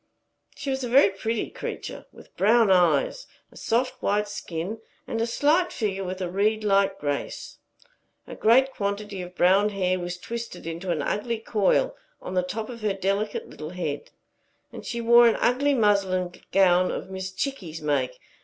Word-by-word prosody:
She 280 -1 -4
was 265 0 -2
a 245 - -3
very 240 -5 +6
pretty 220 +3 -3
creature, - - -6
with - - -17
brown 220 0 +4
eyes, - - +2 0.2
a - - -19
soft 245 +3 -1
white 210 +1 +1
skin, 200 0 -5 0.3
and 225 - -3
a 230 - +1
slight 305 +9 +2
figure 195 -4 -2
with 185 +1 -5
a 180 - -1
reed 215 +3 +1
like 195 -1 +2
grace. 145 -1 -4 0.7
A - - -9
great 260 +5 +4
quantity 200 -1 -3
of 180 0 -9
brown 195 +4 +4
hair 185 -2 0
was 175 0 -4
twisted 235 +2 -7
into 165 +3 -5
an 155 -4 0
ugly 230 +7 -1
coil 220 - +1 0.2
on - - -7
the 185 - +2
top 215 +5 -4
of 235 -2 -9
her 210 -2 0
delicate 195 +2 -1
little 155 0 -8
head; 160 -5 -4 0.6
and - - -8
she 235 0 -3
wore 235 +1 +7
an 230 - +2
ugly 280 +3 +2
muslin 195 -5 +2 0.2
gown 185 -1 +4
of 190 - -5
Miss 190 0 -4
Chickie's 190 - -4
make. 135 -4 -1
200 Hz, 170 wpm, -25 LUFS, 185-230 Hz, 0.7 s, wore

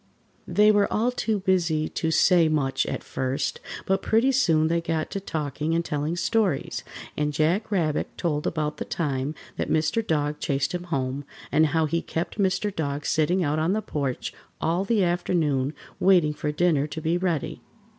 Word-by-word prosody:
] - - -37
They 210 +1 +5
were 205 -1 +2
all 230 +4 +1
too 220 -4 -1
busy 170 -5 +1
to 160 - -2
say 165 +1 +4
much 140 -4 0
at - - -3
first, 130 +2 -2 0.3
but 190 0 +1
pretty 230 +5 +3
soon 165 - +3
they 170 +1 +1
got 165 -1 -2
to 200 - -2
talking 155 -3 -2
and 170 0 0
telling 150 +3 -2
stories, 180 -3 0 0.3
and 150 0 0
Jack 160 +8 +1
Rabbit 165 -7 0
told 150 -4 -1
about 155 -2 -2
the - - -3
time 145 -2 -2 0.2
that - - -2
Mr. 160 +8 +1
Dog 150 -5 -1
chased 140 +2 -1
him 180 0 -3
home, 135 -4 -2 0.3
and 155 +1 +4
how 160 +2 +1
he 165 +2 0
kept 170 +5 -4
Mr. 195 +1 +1
Dog 145 -2 -2
sitting 175 +4 +2
out 150 0 0
on 165 +4 +1
the 215 - 0
porch 140 -4 -3 0.3
all 175 +4 0
the 210 -1 +2
afternoon 165 -6 +1 0.3
waiting 180 -5 +4
for 150 0 -2
dinner 150 -2 +2
to 160 - -6
be 160 +2 0
ready. 175 -6 -2
160 Hz, 180 wpm, -25 LUFS, 150-185 Hz, 0.3 s, They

